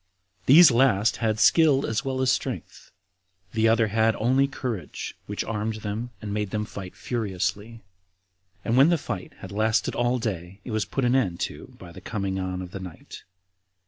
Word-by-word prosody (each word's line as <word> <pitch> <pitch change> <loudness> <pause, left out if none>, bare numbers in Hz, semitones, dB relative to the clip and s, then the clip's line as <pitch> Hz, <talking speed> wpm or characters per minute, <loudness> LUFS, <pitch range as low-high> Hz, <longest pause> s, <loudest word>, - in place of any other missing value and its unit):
These 160 +3 +9
last 115 -4 +3
had 110 -2 0
skill 150 -2 +5
as 110 +3 -1
well 130 -1 -2
as 130 - +3
strength; - - -4 0.6
the 115 0 +3
other 115 -1 +3
had 110 +1 +2
only 130 +4 +2
courage, 115 - -5
which - - -3
armed 110 0 -3
them, 110 +3 -3
and 100 -1 -4
made 105 -1 -2
them 105 +2 -2
fight 95 -3 -9
furiously. 105 0 -3 0.8
And 115 +2 +1
when 140 +5 +7
the 170 - +3
fight 105 - -6
had 95 - -8
lasted 110 +2 +1
all 120 +1 +1
day, 95 -5 -4
it - - -6
was 110 -1 0
put 130 +8 -2
an 120 +1 +3
end 95 -10 +1
to - - -5
by 85 - -12
the - - -12
coming 100 -3 -3
on 95 0 -3
of 90 - -10
the 95 - -6
night. 90 -3 -10
110 Hz, 180 wpm, -25 LUFS, 100-125 Hz, 0.8 s, These